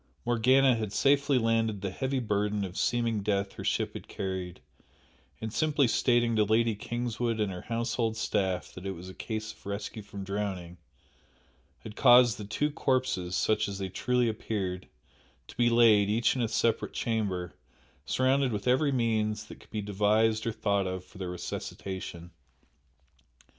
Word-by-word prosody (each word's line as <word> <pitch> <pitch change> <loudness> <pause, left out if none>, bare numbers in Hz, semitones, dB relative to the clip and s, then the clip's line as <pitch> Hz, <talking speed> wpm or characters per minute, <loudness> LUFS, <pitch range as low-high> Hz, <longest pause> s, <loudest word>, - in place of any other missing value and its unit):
Morgana 130 +2 +4
had 110 -3 -3
safely 140 -1 +3
landed 115 -3 +1
the 100 -1 -3
heavy 130 +6 -2
burden 105 -3 0
of 90 -1 -8
seeming 115 -3 0
death 100 -1 -1
her - - -8
ship - - 0
had - - -8
carried, 95 -2 -4 0.8
and 110 -1 -5
simply 150 -3 +2
stating 120 0 +2
to 110 - +4
Lady 110 +2 +2
Kingswood 120 +1 -2
and 105 -2 0
her 90 -1 -6
household 115 -1 -1
staff 95 -4 -1
that 90 +1 -7
it 95 - -2
was 90 +1 -9
a - - -9
case 110 0 -5
of - - -24
rescue 100 +2 -5
from 100 -1 -8
drowning, 95 -3 -4 1.0
had 110 -1 -9
caused 120 -4 +6
the 105 - -5
two 145 +9 -1
corpses 130 - 0
(such 110 0 +1
as 100 -1 -5
they 95 -1 -4
truly 125 +5 +1
appeared) 100 -4 -3 0.6
to - - -12
be 120 0 +3
laid, 110 -4 +5
each 110 +3 +2
in 130 - -1
a 115 - +1
separate 115 0 0
chamber, 100 -6 -2 0.5
surrounded 130 - +2
with 105 +1 -3
every 130 +4 +3
means 110 -4 0
that - - -12
could - - -19
be 105 -2 -4
devised 110 +2 +2
or - - +1
thought 100 -3 0
of 95 0 -4
for 95 +1 -15
their 95 -2 -4
resuscitation. 90 -1 -6
110 Hz, 165 wpm, -29 LUFS, 100-120 Hz, 1.0 s, caused